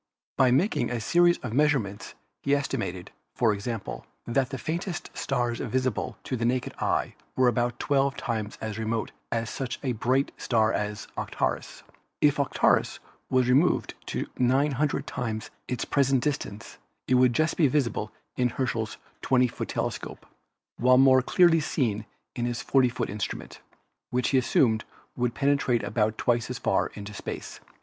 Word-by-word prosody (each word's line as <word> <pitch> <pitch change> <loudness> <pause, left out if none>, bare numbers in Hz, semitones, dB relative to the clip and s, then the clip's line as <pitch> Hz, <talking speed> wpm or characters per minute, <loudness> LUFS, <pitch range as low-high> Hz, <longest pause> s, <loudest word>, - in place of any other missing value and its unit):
By 130 - +4
making 150 - +2
a 125 -1 -2
series 175 +9 +4
of 115 -3 -4
measurements 130 -8 +1 0.3
he 140 +1 +2
estimated, 95 -10 -3 0.2
for 115 -3 +3
example, 110 +3 -5 0.2
that 125 +1 +1
the 135 - -4
faintest 170 +6 -4
stars 120 -3 -1
visible 130 -3 -1
to 130 - -3
the 115 - -3
naked 125 +1 0
eye - - 0 0.2
were 130 -1 +4
about 120 0 +1
twelve 140 -1 +1
times 110 -2 -3
as 110 -1 -4
remote 110 0 -2 0.2
as 115 -1 -1
such 130 -2 -4
a 130 - 0
bright 125 +4 +1
star 110 -2 +2
as 105 0 -3
Arcturus. - - -3 0.4
If 145 -1 +3
Arcturus 140 - +2 0.3
were 130 -1 +3
removed 130 +8 +3
to - - -2
900 140 +3 +2
times 110 -2 -4 0.2
its 125 -2 -2
present 135 -3 +2
distance 115 -7 -4 0.3
it - - +2
would 125 -1 +5
just 155 +5 +1
be 155 - +4
visible 125 -6 0 0.2
in 125 -1 +2
Herschel's 115 -3 -2 0.2
20 125 -1 +3
foot - - -5
telescope, - - -4 0.5
while 125 +1 +5
more 130 0 +6
clearly 170 +4 +4
seen 110 -8 -1 0.3
in 120 - -1
his 120 -1 -3
40 130 -2 +4
foot 120 -1 -3
instrument, 105 -1 -5 0.5
which 125 0 0
he 135 - +4
assumed 115 -3 +2 0.3
would 120 -1 -1
penetrate 135 -4 +2
about 110 -1 0
twice 120 -1 +1
as 125 - -3
far 95 -7 +1
into 105 0 -7
space. - - -6
125 Hz, 155 wpm, -27 LUFS, 115-135 Hz, 0.5 s, more